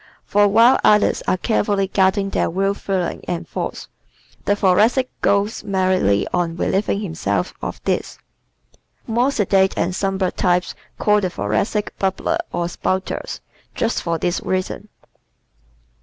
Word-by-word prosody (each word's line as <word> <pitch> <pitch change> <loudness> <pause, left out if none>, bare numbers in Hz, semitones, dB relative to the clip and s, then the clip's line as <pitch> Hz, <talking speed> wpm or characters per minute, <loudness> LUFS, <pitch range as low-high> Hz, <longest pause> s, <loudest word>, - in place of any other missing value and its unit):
For 205 0 +3
while 230 +5 +5
others 210 0 +4
are 185 - +2
carefully 205 -1 +1
guarding 195 +1 +1
their - - 0
real 195 +3 0
feelings 190 -3 -3
and 175 -1 -3
thoughts - - -5 0.6
the 205 - +2
Thoracic 215 +7 +3
goes 200 +2 +1
merrily 185 - +1
on 170 -2 0
relieving 200 +3 0
himself 100 - -2
of - - -5
his. - - -1 0.9
More 240 +4 +1
sedate 195 -6 +2
and 180 - 0
somber 195 -1 0
types 180 -1 0 0.2
call 210 0 +3
the 185 - 0
Thoracics 140 - -1
"bubblers" 195 - 0
or 175 0 -1
"spouters" 185 +2 -3 0.3
just 230 - 0
for 170 -1 -1
this 175 +2 -1
reason. 185 +3 -3
195 Hz, 130 wpm, -20 LUFS, 180-205 Hz, 0.9 s, while